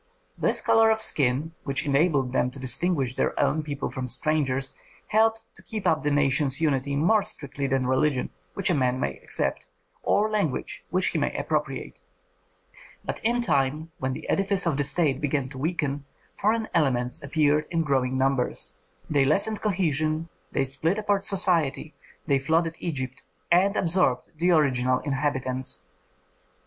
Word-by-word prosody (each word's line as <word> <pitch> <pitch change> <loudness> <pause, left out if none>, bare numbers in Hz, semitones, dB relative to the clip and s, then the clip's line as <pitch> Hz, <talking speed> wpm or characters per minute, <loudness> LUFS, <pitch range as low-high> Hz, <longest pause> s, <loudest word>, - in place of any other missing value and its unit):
This - - +1
color 225 0 +4
of 220 0 +2
skin, 145 - +2
which 140 -1 -1
enabled 140 -3 +2
them 125 - +1
to 130 +2 -11
distinguish 135 +1 +1
their - - -1
own 155 - +2
people 145 -2 -4
from 130 -1 -4
strangers, 135 -1 0 0.4
helped 225 +1 +2
to - - -14
keep 215 -3 -6
up 155 -1 +2
the 150 - 0
nation's 140 -1 +1
unity 140 -3 0
more 190 +9 +3
strictly 140 -5 -4
than 135 -1 0
religion, 130 +1 +1 0.2
which 195 -2 +1
a - - +3
man 130 -3 +1
may 70 - -3
accept, - - -2 0.3
or 210 +1 +2
language, 205 -11 -2
which 185 +1 +2
he - - -1
may - - -1
appropriate. - - -3 1.1
But - - -4
in 240 +2 +1
time, 150 - 0
when 130 0 -2
the - - -8
edifice 195 -1 +1
of 165 -4 +1
the 145 - +2
state 140 -1 +1
began 145 -1 0
to 135 -1 -9
weaken, 145 -3 -2 0.3
foreign 220 +2 0
elements 125 -6 +1
appeared 150 +1 +1
in 165 -1 0
growing 130 -3 0
numbers. 135 -1 0 0.3
They 145 -3 +2
lessened 200 +9 +2
cohesion, 160 -5 0 0.2
they - - +1
split 140 +8 0
apart 205 -2 0
society, 170 -7 +2 0.3
they 140 -2 +2
flooded 165 +4 +1
Egypt 130 -6 -4 0.3
and 190 +4 +4
absorbed 165 -8 +1
the 170 +3 +1
original 130 -6 +3
inhabitants. 130 -7 -1
150 Hz, 155 wpm, -26 LUFS, 135-175 Hz, 1.1 s, color